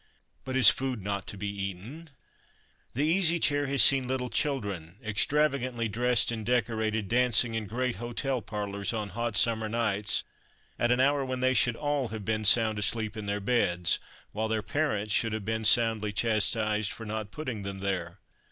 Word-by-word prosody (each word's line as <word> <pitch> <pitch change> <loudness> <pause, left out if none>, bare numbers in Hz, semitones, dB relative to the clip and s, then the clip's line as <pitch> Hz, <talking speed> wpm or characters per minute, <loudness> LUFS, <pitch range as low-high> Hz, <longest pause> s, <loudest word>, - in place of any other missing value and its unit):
But 130 - -4
is 130 -5 +8
food 130 -6 -4
not 100 +1 -3
to 105 - -7
be 105 +1 -4
eaten? 100 - -6 0.9
The 140 - +1
Easy 170 0 +3
Chair 145 -2 +2
has 140 0 +4
seen 135 -2 +5
little 125 -1 -3
children, 100 - -2
extravagantly 130 +1 0
dressed 120 +3 +2
and 110 -2 -4
decorated, 110 -2 -1
dancing 120 0 +3
in 110 -2 -3
great 120 +1 -2
hotel 120 +3 -3
parlors 100 -1 -4
on 105 -2 -3
hot 115 +3 -3
summer 110 -2 +2
nights 105 -3 +1 0.6
at 120 - +2
an 125 - +2
hour 140 +1 +2
when 130 -1 -4
they 130 0 +2
should 120 -1 +3
all 145 -2 -1
have 110 -2 -7
been 110 0 -1
sound 110 0 +4
asleep 110 0 -1
in 105 -2 -6
their 100 0 -1
beds, 90 -6 +1 0.3
while 110 +1 -2
their 110 -1 -2
parents 110 -7 -1
should 115 +1 +1
have 110 -2 -4
been 110 0 -2
soundly 110 -1 +3
chastised 110 -1 0
for 115 - -8
not 110 -1 -4
putting 130 -5 -6
them 100 0 -6
there. 95 -2 -3
110 Hz, 175 wpm, -28 LUFS, 105-125 Hz, 0.9 s, is